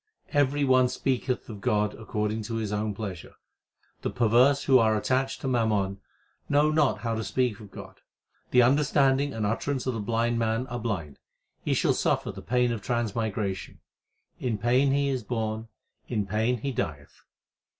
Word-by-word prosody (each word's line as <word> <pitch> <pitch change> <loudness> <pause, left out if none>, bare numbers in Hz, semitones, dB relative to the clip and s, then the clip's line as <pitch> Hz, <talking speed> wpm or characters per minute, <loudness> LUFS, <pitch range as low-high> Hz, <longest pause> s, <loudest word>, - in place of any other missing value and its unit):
Every 145 0 +2
one 130 -2 +4
speak 130 0 -1
eth 125 - -1
of 105 -3 -8
God 105 0 +1
according 110 0 -3
to 115 - -4
his 110 -2 -2
own 105 0 -1
pleasure. 95 -6 -7 0.7
The - - -1
perverse 125 +5 +3
who 130 -1 +5
are 110 -1 +3
attached 130 +4 0
to - - -3
mammon, 105 -6 +1 0.5
know 145 +1 +4
not 140 -9 +2
how 115 0 -1
to 110 0 -2
speak 125 -2 0
of 105 -2 -11
God. - - -11 0.5
The 125 -1 +5
understanding 140 +1 +3
and 110 -4 -2
utterance 130 +5 -1
of 130 - 0
the 115 - -3
blind 115 +2 0
man 115 +2 0
are 120 0 -4
blind; 90 -11 -4 0.4
he - - +1
shall - - +2
suffer - - 0
the - - -9
pain 125 0 +1
of 115 -3 -3
transmigration. 110 -4 -2 0.6
In 120 -4 -1
pain 125 +6 +3
he 140 +1 +2
is 130 -2 -1
born, 110 -1 -3 0.4
in 105 -4 -1
pain 110 +5 0
he 140 - -2
dieth. 75 - -5
115 Hz, 170 wpm, -27 LUFS, 105-130 Hz, 0.7 s, who